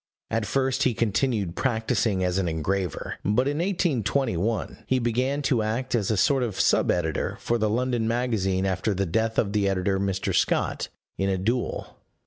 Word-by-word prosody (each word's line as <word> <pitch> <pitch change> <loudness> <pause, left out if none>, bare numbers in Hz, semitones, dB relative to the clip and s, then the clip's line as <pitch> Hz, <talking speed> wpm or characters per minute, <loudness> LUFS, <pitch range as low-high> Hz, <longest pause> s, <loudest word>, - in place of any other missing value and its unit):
At 115 -2 0
first 135 +3 0
he 125 -4 +2
continued 105 -4 0
practising 110 -5 0
as 90 +1 +1
an 95 - 0
engraver; 85 +1 -2
but 120 +6 +2
in 145 +2 -1
1821 130 - 0
he 130 - +2
began 130 +4 0
to 130 -4 +2
act 110 +4 -2
as 110 -5 +1
a 110 - +1
sort 135 +6 +3
of 115 -6 -2
sub - - +3
editor 80 -3 0
for 120 0 0
the 110 -1 +1
London 120 0 0
Magazine 110 -6 0
after 95 +2 0
the 100 +1 0
death 110 +6 0
of 100 -2 +1
the 100 -2 +2
editor, 95 0 0
Mr. 95 -1 -1
Scott, - - +1 0.3
in 95 0 +1
a 95 - +1
duel. 115 +6 -2
110 Hz, 175 wpm, -26 LUFS, 95-125 Hz, 0.3 s, sort